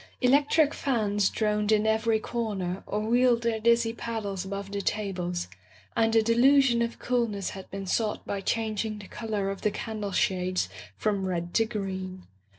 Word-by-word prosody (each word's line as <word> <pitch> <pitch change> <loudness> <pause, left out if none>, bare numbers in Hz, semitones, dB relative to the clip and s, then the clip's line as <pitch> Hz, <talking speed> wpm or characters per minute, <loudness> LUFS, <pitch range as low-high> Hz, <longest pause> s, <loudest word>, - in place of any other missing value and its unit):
Electric 285 +4 +4
fans 210 -7 +1
droned 210 -1 0
in 215 0 +3
every 220 0 +2
corner 200 -6 -3
or 210 - -1
wheeled 240 +1 +3
their 230 -1 0
dizzy 235 0 +3
paddles 215 -5 -4
above 200 0 -5
the 200 0 -2
tables, 180 - -2 0.5
and 225 0 +2
a 225 - +5
delusion 240 +2 +4
of 235 0 -1
coolness 230 -6 -1
had 190 -1 -9
been 195 0 -5
sought 210 +3 -1
by 200 - -3
changing 220 0 -1
the 205 -2 -10
color 210 -4 -2
of 195 - -7
the 210 - +2
candle 210 -1 -4
shades 185 - 0 0.3
from 200 -3 0
red 175 -1 -3
to 225 - +3
green. 190 -4 -5
215 Hz, 160 wpm, -28 LUFS, 195-230 Hz, 0.5 s, a